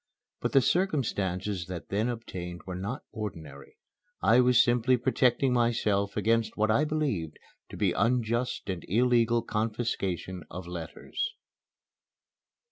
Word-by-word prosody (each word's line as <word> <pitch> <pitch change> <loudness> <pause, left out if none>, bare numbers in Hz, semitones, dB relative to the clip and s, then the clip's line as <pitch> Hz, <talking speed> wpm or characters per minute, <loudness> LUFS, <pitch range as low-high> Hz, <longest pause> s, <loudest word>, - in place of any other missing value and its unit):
But - - -2
the 135 - +6
circumstances 105 - 0
that 90 -2 -7
then 105 +5 0
obtained 90 -7 -6
were 95 - -5
not 100 +8 -4
ordinary. 80 -10 -7 0.4
I 115 +2 +5
was 125 -1 +4
simply 125 +1 +4
protecting 125 +1 +2
myself 110 -4 +1
against 115 0 +1
what 110 0 +2
I 140 +8 +3
believed 140 - -2 0.3
to - - -9
be - - +2
unjust 120 +2 0
and 90 -4 -3
illegal 120 +1 +3
confiscation 105 -5 -2
of 90 0 -7
letters. 90 - -5
110 Hz, 125 wpm, -29 LUFS, 95-125 Hz, 0.4 s, the